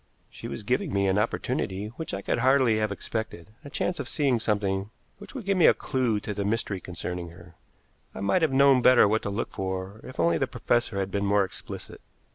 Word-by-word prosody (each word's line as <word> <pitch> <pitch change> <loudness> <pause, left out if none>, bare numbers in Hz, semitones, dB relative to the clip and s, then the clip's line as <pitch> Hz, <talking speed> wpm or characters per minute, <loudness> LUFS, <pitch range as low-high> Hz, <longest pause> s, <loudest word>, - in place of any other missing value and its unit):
She - - -8
was 110 - -6
giving 125 +5 0
me 100 0 +1
an 95 +2 +2
opportunity 105 -2 -2
which 145 +8 -7
I 95 - -4
could - - 0
hardly 130 -3 +4
have 110 -1 0
expected, 105 -3 -5
a 145 - -9
chance 175 +3 -2
of 140 - -4
seeing 140 -6 +1
something 100 -2 -1 0.3
which 205 - -12
would 245 -7 -6
give 195 -1 +1
me 170 - +7
a - - +6
clew 125 -6 0
to 105 - -4
the 100 0 -2
mystery 100 -2 -1
concerning 90 -1 -5
her. 85 0 -15 0.6
I - - -6
might 135 - +2
have 160 -3 +2
known 135 -1 +5
better 125 -3 +6
what 110 +2 +1
to - - -3
look 100 +3 -3
for 95 +2 -4
if 130 - -10
only 85 -1 +3
the - - +1
professor 120 -4 0
had 95 0 -2
been 100 +1 -1
more 100 0 +4
explicit. 95 - -7
105 Hz, 220 wpm, -27 LUFS, 95-130 Hz, 0.6 s, me